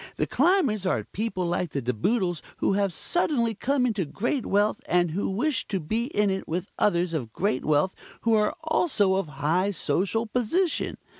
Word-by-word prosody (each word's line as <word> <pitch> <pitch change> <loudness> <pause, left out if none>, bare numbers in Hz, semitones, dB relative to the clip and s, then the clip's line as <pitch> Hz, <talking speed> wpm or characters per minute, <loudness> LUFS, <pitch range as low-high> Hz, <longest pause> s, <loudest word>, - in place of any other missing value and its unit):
The - - +1
Climbers 285 - +2
are - - +1
people 205 -4 -3
like 175 -2 -1
the 140 - -1
De 125 +1 0
Boodles, 175 - 0 0.2
who - - +1
have 200 -1 +1
suddenly 235 - 0
come 255 +4 0
into 215 -6 0
great 235 - -2
wealth, 205 +2 +2
and 175 -2 +2
who 195 +6 -1
wish 255 +7 -1
to 195 - -1
be 220 +9 -1
in 210 -7 +1
it 190 0 -3
with 180 +4 -3
others 175 -3 +2
of 125 -8 -3
great 175 - -1
wealth 155 +5 +2 0.3
who 230 - +2
are 210 -1 +2
also 300 - +2
of 195 -4 -1
high 155 +7 0
social 195 +5 0
position. 265 - 0
200 Hz, 180 wpm, -26 LUFS, 175-235 Hz, 0.3 s, Climbers